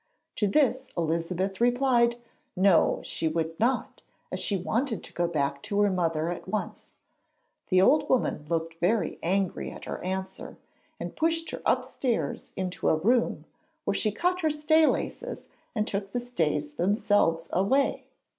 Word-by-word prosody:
To 210 - +2
this 260 +2 +2
Elizabeth 170 +4 -1
replied 245 -1 +3 0.4
No; 185 -2 +4
she 165 - -2
would 160 0 -2
not, 255 +2 0 0.3
as - - -3
she 200 - 0
wanted 225 +5 -1
to - - -10
go 175 0 0
back 140 -4 -1
to 205 -1 -2
her 205 -1 +3
mother 165 -3 0
at 175 - -7
once. 215 - -4 0.7
The 185 0 +5
old 300 +9 +4
woman 195 -11 +1
looked 165 0 -2
very 205 +5 +1
angry 190 +1 0
at - - -10
her - - -5
answer, 190 +1 -5 0.4
and - - -6
pushed 330 +1 0
her - - -6
upstairs 225 - -1
into 185 -2 -1
a - - +4
room, 235 +9 +1 0.4
where - - +1
she 215 - +1
cut 360 - 0
her 315 - +2
stay 310 +1 +4
laces, - - -2 0.3
and 215 -2 +1
took 195 -1 -3
the 245 - 0
stays 155 -11 -1
themselves 195 -2 +2
away. 260 +10 +2
200 Hz, 155 wpm, -27 LUFS, 170-245 Hz, 0.7 s, The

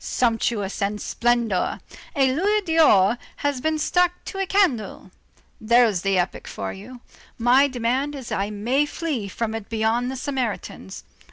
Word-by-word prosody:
Sumptuousness 225 -4 -1
and 205 +1 -1
splendor. 235 -6 0 0.4
A 265 -2 +3
louis 410 +8 +1
d'or 245 - +4 0.2
has 285 -3 -2
been 315 +2 0
stuck 355 +3 +2
to 390 - -6
a 390 - -1
candle. 265 - 0 0.5
There's 225 -4 +4
the 195 -1 +1
epoch 180 +1 -2
for - - -5
you. 235 +6 -11 0.4
My 250 +4 +4
demand 260 +3 -1
is 265 -4 -8
that - - -2
I 200 +1 -1
may 240 +8 0
flee 290 -11 -3
from 220 +3 -3
it 225 -2 -6
beyond 225 +2 0
the 265 - -4
Sarmatians. 250 -7 -4
240 Hz, 155 wpm, -23 LUFS, 215-285 Hz, 0.5 s, d'or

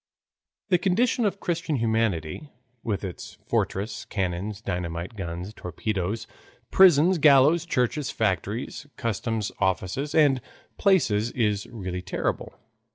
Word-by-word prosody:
The 180 -2 +4
condition 225 +6 +2
of 195 -1 -1
Christian 170 -3 -1
humanity 110 - -1 0.3
with 105 -3 -2
its 95 -3 -7
fortresses, 100 +3 -2
cannons, 95 +1 -3
dynamite, 90 -1 -4
guns, 90 +1 -5
torpedoes, 105 +3 -3 0.5
prisons, 180 -1 +6
gallows, 150 +4 +5
churches, 130 +1 0
factories, 110 - -2
customs 115 -2 -2
offices, 95 +10 -1
and 145 -5 +4 0.4
palaces 120 - +3
is 105 -5 0
really 95 -5 -5
terrible. - - -3
110 Hz, 105 wpm, -26 LUFS, 95-150 Hz, 0.5 s, prisons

